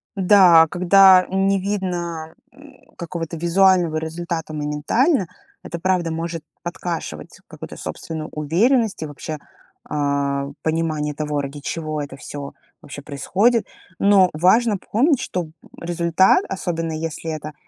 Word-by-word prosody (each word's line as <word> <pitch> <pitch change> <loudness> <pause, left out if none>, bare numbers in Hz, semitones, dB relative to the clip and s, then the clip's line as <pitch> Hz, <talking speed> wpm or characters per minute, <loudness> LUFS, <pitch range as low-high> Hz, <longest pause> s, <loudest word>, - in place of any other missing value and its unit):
Да, 180 -4 +6
когда 185 +1 +6
не 195 +1 +1
видно, 175 -5 -4 0.2
м, - - -16 0.2
какого-то 170 -1 -5
визуального 175 -1 +3
результата 160 0 -4
моментально, 155 - 0 0.4
это 170 - -6
правда 180 -2 0
может 165 0 -4 0.2
подкашивать 165 - -6
какую-то - - -10
собственную 160 -1 -6
уверенность 210 - +1
и 155 - -2
вообще, 150 +1 -7 0.5
а, 140 -1 -1
понимание 155 -2 -1
того, 150 -1 -2
ради 140 +1 -7
чего 155 0 -4
это 145 -2 -7
всё 140 0 -8 0.3
вообще 145 0 -9
происходит. 200 - +1 0.3
Но 195 -2 +5
важно 205 +7 +3
помнить, 260 - +1
что, 185 -8 -3
м, 155 - -12 0.3
результат, 175 - +3
особенно 165 -3 -3
если 160 0 -4
это 155 0 -6
165 Hz, 120 wpm, -21 LUFS, 155-190 Hz, 0.5 s, Да